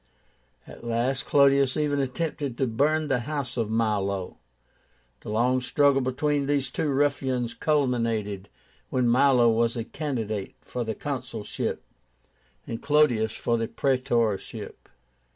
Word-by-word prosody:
At - - -13
last 120 +3 -1
Clodius 140 -2 +4
even 145 -2 +1
attempted 140 -1 -2
to 135 - +1
burn 150 +7 +1
the 135 -3 +1
house 130 0 -4
of 115 -3 -1
Milo. 100 -4 -1 0.8
The - - -9
long 125 +4 +2
struggle 140 +1 +3
between 140 +2 0
these 140 -2 0
two 155 - -1
ruffians 135 -4 0
culminated 115 -9 0 0.4
when 125 -1 +1
Milo 125 -1 +5
was 115 +1 +1
a 115 - -2
candidate 110 -8 -4
for 125 - -4
the 110 -1 -3
consulship, - - -4 0.8
and 115 - -5
Clodius 125 -8 +3
for 115 -1 -1
the 115 - -1
praetorship. 120 -8 -1
125 Hz, 125 wpm, -26 LUFS, 115-140 Hz, 0.8 s, Milo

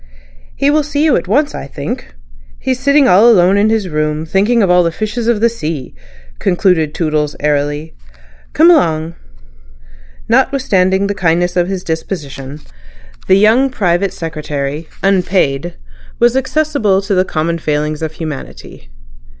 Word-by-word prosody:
"He 280 +1 +1
will 305 +1 +3
see 295 0 -2
you 305 - +3
at 175 - -2
once, 285 +9 +1
I - - -6
think. 65 - -6 0.4
He's 255 -1 -2
sitting 280 +1 +3
all 200 +6 +6
alone 190 -3 +4
in 205 +2 +3
his 220 -3 0
room 155 -1 -2
thinking 205 +7 +2
of 185 - +2
all 180 0 +5
the 170 -1 0
fishes 215 +5 -4
of 235 -3 +1
the 235 - +5
sea," 160 - -5 0.5
concluded 175 -4 +1
Toodles 150 -3 -1
airily. 145 +1 -1 0.6
"Come 330 +3 +6
along." 165 - +1 1.1
Notwithstanding 195 -8 +1
the 200 - -1
kindness 175 -2 0
of 175 -1 +1
his 190 -1 -4
disposition, 150 -4 -6 0.7
the 190 - +5
young 225 +7 +4
private 195 -5 0
secretary 155 -3 -5
(unpaid) 175 -5 0 0.4
was 240 +1 +3
accessible 265 -8 0
to 200 +1 -2
the 185 -1 +3
common 165 -1 -2
failings 150 0 -2
of 160 -1 -4
humanity. 150 - -8
180 Hz, 145 wpm, -14 LUFS, 155-220 Hz, 1.1 s, all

